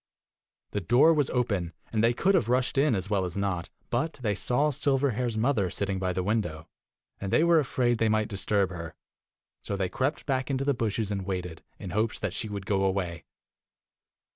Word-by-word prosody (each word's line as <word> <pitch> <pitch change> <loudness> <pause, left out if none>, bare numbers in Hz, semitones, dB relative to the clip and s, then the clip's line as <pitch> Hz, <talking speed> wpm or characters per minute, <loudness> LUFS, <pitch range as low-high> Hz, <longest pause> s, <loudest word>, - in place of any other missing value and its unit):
The 105 - -2
door 130 - +5
was 145 -4 +1
open, 100 -9 -1 0.2
and 110 -1 +2
they 115 - +5
could 190 +8 +3
have 145 - +2
rushed 130 +2 +2
in 140 -4 +3
as 95 0 -2
well 100 -2 +1
as 90 +1 -4
not, 95 -3 -2 0.2
but 140 +7 0
they 115 -6 -2
saw 125 +9 +1
Silverhair's 130 -5 0
mother 110 -5 +1
sitting 95 +1 -1
by 95 -1 0
the 90 0 -1
window, 90 -7 -1 0.5
and 100 -1 -4
they - - +4
were 170 -1 +5
afraid 125 -4 +1
they 115 - +3
might 110 0 +2
disturb 100 -1 0
her; 85 -2 -7 0.7
so 100 - -3
they 95 -2 -1
crept 140 - -1
back 130 -2 -1
into 135 0 -1
the 140 - +3
bushes 110 -3 -1
and 100 -2 -2
waited, 90 -3 -4 0.2
in - - -7
hopes 110 +1 0
that 105 -3 -3
she 110 - -3
would 100 -2 -5
go 100 -2 +1
away. 95 -4 -1
110 Hz, 195 wpm, -28 LUFS, 95-130 Hz, 0.7 s, door